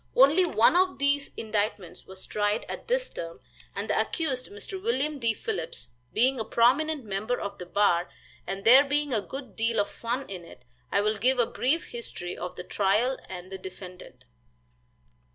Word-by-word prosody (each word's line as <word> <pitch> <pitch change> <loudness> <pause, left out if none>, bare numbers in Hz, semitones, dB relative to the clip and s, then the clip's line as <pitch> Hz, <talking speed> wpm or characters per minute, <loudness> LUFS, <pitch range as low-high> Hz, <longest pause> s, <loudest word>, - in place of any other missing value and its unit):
Only 285 +8 +6
one 275 -2 +4
of 370 -5 +3
these 280 0 +2
indictments 210 -4 -2
was 190 0 -8
tried 210 +1 0
at - - -7
this - - +1
term, 165 0 -7 0.4
and - - -3
the - - +2
accused, 270 -7 -2
Mr. 405 -2 -6
William 305 -10 0
D. 230 -2 +2
Phillips, 475 - -3 0.2
being 255 +3 +2
a - - 0
prominent 265 +6 +2
member 215 +4 -2
of 200 - -5
the 180 - -7
bar, 180 -3 +2 0.4
and 195 0 -4
there 255 +5 +9
being 290 -1 0
a 215 - +2
good 260 +1 -8
deal 230 0 +1
of 205 - 0
fun 245 +4 -3
in 185 -3 -7
it, 165 - -14 0.3
I 200 - +3
will 215 +1 +1
give 255 +5 +3
a 240 - +4
brief 285 +8 0
history 180 -7 -5
of 180 - -6
the 180 - -6
trial 215 +8 +1
and 185 0 -8
the 190 - -6
defendant. 185 -1 -10
235 Hz, 180 wpm, -27 LUFS, 200-280 Hz, 0.4 s, there